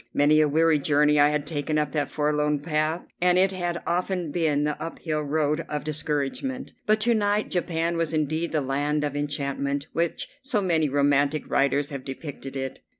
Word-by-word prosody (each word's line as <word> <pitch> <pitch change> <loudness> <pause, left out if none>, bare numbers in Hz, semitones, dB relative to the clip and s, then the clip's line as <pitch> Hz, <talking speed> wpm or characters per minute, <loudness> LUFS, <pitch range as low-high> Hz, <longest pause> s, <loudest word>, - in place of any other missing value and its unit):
Many 150 +2 +5
a 155 - +4
weary 160 +1 +3
journey 150 +1 +3
I 145 0 +6
had 150 -1 -1
taken 150 0 -2
up 150 -2 0
that 145 -2 -1
forlorn 150 -1 0
path, 155 +2 -1 0.2
and 180 0 +4
it 190 +1 +4
had 175 -2 -3
often 180 -2 -1
been 150 -3 +1
the 150 0 -2
up 165 - -5
hill 155 -2 -2
road 150 +2 0
of 150 -1 -3
discouragement; 155 - -2
but 215 0 +4
to 235 +2 +3
night 210 -1 +1
Japan 170 -1 -1
was 165 -2 0
indeed 155 +2 -1
the 155 - +1
land 145 +3 0
of 145 -1 -2
enchantment 140 -1 -2
which 170 0 -1
so 265 -5 0
many 165 -6 +1
romantic 145 +1 +2
writers 140 +1 +1
have 140 -2 -5
depicted 135 0 -7
it. 135 -1 -4
150 Hz, 185 wpm, -25 LUFS, 145-170 Hz, 0.2 s, I